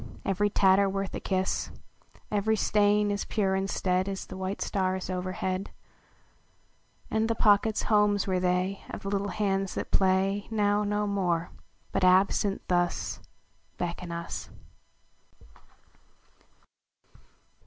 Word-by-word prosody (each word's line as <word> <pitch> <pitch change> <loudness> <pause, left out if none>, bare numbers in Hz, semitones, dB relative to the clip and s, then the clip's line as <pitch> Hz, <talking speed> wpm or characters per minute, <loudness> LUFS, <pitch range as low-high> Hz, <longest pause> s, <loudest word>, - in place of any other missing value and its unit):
Every 200 +2 +1
tatter 195 0 +4
worth 195 0 -3
a - - -3
kiss; 190 -1 -1 0.6
Every 210 +1 +2
stain 210 0 +2
as 200 - -1
pure 195 -3 0
instead 190 -1 0
As 195 -1 -4
the - - -9
white 190 +1 -4
stars 185 -1 -1
overhead: 185 +1 -3 1.4
And 220 +1 +1
the 230 - +1
pockets 215 0 +3
homes 210 -2 +3
were 185 -2 0
they 180 +2 0
Of - - -7
the 195 - -3
little 200 0 -1
hands 195 -1 -1
that - - -4
play 195 +1 +2
Now 210 -1 +2
no 205 0 0
more 180 -5 -1 0.4
hut, - - 0
absent, 195 +2 +3
thus 175 -1 0 0.6
Beckon 175 0 -4
us. 170 0 -5
195 Hz, 120 wpm, -28 LUFS, 185-205 Hz, 1.4 s, tatter